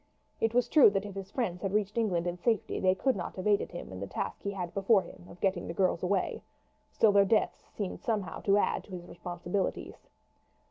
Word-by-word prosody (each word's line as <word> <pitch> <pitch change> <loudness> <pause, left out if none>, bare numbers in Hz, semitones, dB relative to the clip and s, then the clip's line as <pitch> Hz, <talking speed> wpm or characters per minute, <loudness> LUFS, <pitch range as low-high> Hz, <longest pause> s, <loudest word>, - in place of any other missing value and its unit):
It 225 +1 0
was 245 -1 +3
true 285 -3 +7
that 200 0 -1
if 200 - -7
his 195 0 -7
friends 195 -7 -2
had 195 -1 -2
reached 210 -1 0
England 190 -7 +1
in 175 0 -1
safety 225 +1 0
they 185 0 +3
could 265 +6 +1
not 175 -3 -5
have 185 - -5
aided 205 -1 +2
him 175 - -8
in 95 - -7
the 100 - -4
task - - -4
he 200 - -3
had 180 -4 -4
before 195 0 +3
him 175 - -13
of 175 - -13
getting 190 -3 0
the 165 - -5
girls 185 -2 +1
away; 185 +1 0 0.5
still 220 - +4
their 200 0 +6
deaths 210 +2 +1 0.3
somehow 215 -9 -2
seemed - - -12
to 200 0 +5
add - - +1
to - - -21
his 175 -1 -6
responsibilities. 175 +2 -4
195 Hz, 225 wpm, -30 LUFS, 180-210 Hz, 0.5 s, true